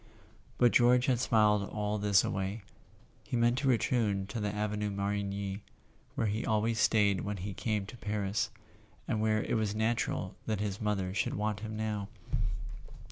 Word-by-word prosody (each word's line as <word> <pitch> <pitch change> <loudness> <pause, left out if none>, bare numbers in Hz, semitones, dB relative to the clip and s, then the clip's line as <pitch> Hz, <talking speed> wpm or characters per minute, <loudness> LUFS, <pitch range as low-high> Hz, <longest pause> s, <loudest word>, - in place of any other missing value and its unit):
But 120 -1 +5
George 125 +1 +5
had 125 -3 +2
smiled 105 -4 +3
all 105 0 -2
this 100 -1 +4
away. 95 +2 -2 0.6
He 125 - -2
meant 120 +2 +3
to 135 - 0
return 110 -5 +2
to 115 - -3
the 105 -1 -1
Avenue 105 0 -1
Marigny, 100 0 -2 0.5
where - - 0
he 110 +2 -1
always 110 +1 +1
stayed 100 -4 +3
when 100 0 -3
he 100 +2 -5
came 105 -1 -1
to 120 - -10
Paris, 105 0 -1 0.6
and 110 -4 0
where 110 0 +2
it - - -1
was 105 -1 0
natural 110 +2 -1
that 110 -2 0
his 100 -1 -3
mother 100 -3 -1
should 105 - 0
want 105 0 -1
him 110 0 -5
now. 105 -2 -2
105 Hz, 165 wpm, -31 LUFS, 100-110 Hz, 0.6 s, But